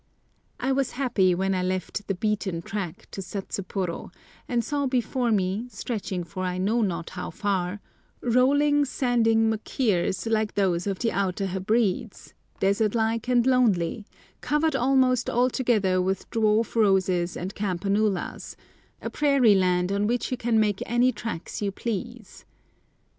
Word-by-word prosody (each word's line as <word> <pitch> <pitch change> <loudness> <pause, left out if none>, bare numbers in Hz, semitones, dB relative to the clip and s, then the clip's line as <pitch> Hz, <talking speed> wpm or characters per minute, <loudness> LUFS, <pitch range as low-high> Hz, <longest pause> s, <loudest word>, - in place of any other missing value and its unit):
I 260 +2 0
was 270 -1 0
happy 230 -9 +2
when 190 +2 0
I 185 - 0
left 185 +2 -3
the 195 - -1
"beaten 195 -4 -2
track" 195 +1 -5
to 195 - -5
Satsuporo, 190 -2 -4 0.4
and 240 -1 0
saw 285 0 -1
before 250 -1 0
me, 200 +3 0
stretching 200 -7 -4
for 185 +3 -6
I 180 0 -2
know 210 +6 +1
not 175 -5 -2
how 180 0 -5
far, 200 -2 -2 0.4
rolling, 285 +4 +3
sandy 245 -5 +1
machirs 220 -4 0
like 220 -2 0
those 185 -2 +1
of 195 -2 -1
the 230 +2 0
Outer 195 0 -1
Hebrides, 195 +2 -1 0.3
desert 200 +3 +1
like 225 +1 0
and 245 -1 +3
lonely, 220 -5 +2 0.3
covered 300 0 +1
almost 260 -1 +2
altogether 235 -7 +2
with 190 +1 -2
dwarf 220 0 +2
roses 190 -5 +2
and 185 +3 -5
campanulas, 200 0 -1 0.5
a - - -4
prairie 275 -7 +4
land 180 -1 +2
on 200 +1 +1
which 245 +3 -1
you 255 - -1
can 230 -2 +1
make 210 -3 +1
any 240 +2 +3
tracks 220 -6 -6
you 200 -1 0
please. 235 +1 -6
210 Hz, 140 wpm, -26 LUFS, 190-240 Hz, 0.5 s, prairie